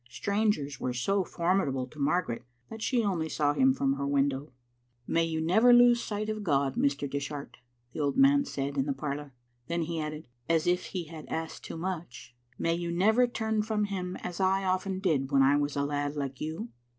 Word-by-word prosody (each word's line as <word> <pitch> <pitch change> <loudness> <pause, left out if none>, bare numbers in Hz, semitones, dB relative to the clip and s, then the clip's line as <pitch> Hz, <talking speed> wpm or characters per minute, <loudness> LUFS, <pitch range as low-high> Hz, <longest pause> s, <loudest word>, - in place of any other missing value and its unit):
Strangers 200 - -1
were 125 -1 -2
so 195 +10 +1
formidable 170 -8 0
to 150 +4 -15
Margaret 145 -4 0 0.3
that 225 - -7
she 240 0 +1
only 175 -6 -1
saw 145 -1 +1
him 135 -2 +4
from 135 +1 0
her 140 0 -2
window. 140 0 0 0.3
" 120 0 -42
May 165 0 +2
you 160 -1 -2
never 220 +10 +5
lose 240 0 +6
sight 210 0 -3
of 215 -1 -3
God, 140 -6 +1
Mr. 140 0 +1
Dishart," 140 -2 -5 0.4
the - - -6
old 145 -2 0
man 280 +1 +6
said 140 - -3
in 135 - +1
the 140 - +1
parlour. 140 0 -5 0.3
Then 170 0 -1
he 165 0 -3
added, 155 +1 -5 0.2
as 165 -1 +2
if 180 +1 +1
he 180 -2 -4
had 160 -1 -10
asked 160 0 -4
too - - -6
much, 170 -8 -6
" 125 +1 -35
May 165 - +1
you 170 0 -2
never 220 +8 +4
turn 220 -2 -1
from 215 0 -1
Him 185 -3 -3
as 180 0 -5
I 190 0 +2
often 185 0 0
did 145 -8 +1
when 135 -1 +5
I 140 +2 +5
was 145 0 0
a 140 0 0
lad 145 0 -2
like 140 -3 -4
you." 160 +10 -4
160 Hz, 210 wpm, -29 LUFS, 140-195 Hz, 0.4 s, lose